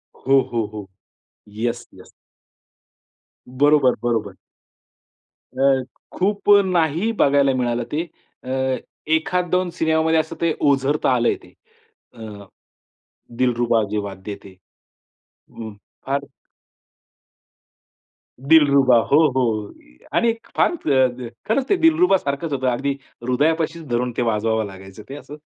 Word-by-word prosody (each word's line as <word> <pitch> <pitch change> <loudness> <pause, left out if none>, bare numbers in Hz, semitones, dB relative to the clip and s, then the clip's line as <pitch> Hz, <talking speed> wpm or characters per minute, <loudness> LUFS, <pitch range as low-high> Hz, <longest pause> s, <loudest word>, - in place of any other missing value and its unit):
हो, 135 +1 +3
हो, 115 -2 0
हो, 105 -2 -7 0.7
येस, 120 +1 -3
येस. - - -16 1.4
बरोबर, 140 0 +3
बरोबर. 115 -4 -1 1.2
अ, 135 -1 +3 0.3
खूप 200 +2 -1 0.2
नाही 175 +3 +1
बघायला 140 -1 +3
मिळालं 120 -1 -1
ते. 160 +3 -1 0.4
अ, 130 0 -1 0.4
एखाद 180 +2 0
दोन 180 0 +1
सिनेमामध्ये 160 0 +2
असं 160 0 -3
ते 165 -1 +2 0.2
ओझरता 140 +1 +1
आलंय 120 -1 +1
ते - - -18 0.6
अ, 110 -4 -10 0.9
दिलरुबा 120 -2 +2
जे 105 - -1
वाद्य 100 +1 -7
ते 100 - -11 1.0
हं, 110 -2 -8 0.3
फार 140 +1 0 2.2
दिलरुबा 140 -3 +5
हो, 145 +7 +3
हो 110 -5 -1 0.4
आणि 235 -1 +3 0.2
फार - - +3
अ, 130 - 0 0.2
खरंच 260 +5 0
ते - - +4
दिलरुबा 325 - +4
सारखंच 145 0 -4
होतं. 130 -1 -1
अगदी 130 +3 0 0.3
हृदयापाशी 155 +6 0
धरून 120 +1 -1
ते - - +1
वाजवावं 110 -1 0
लागायचं 95 +1 -12
ते 135 - -7
असं. 145 0 -10
135 Hz, 115 wpm, -21 LUFS, 120-160 Hz, 2.2 s, दिलरुबा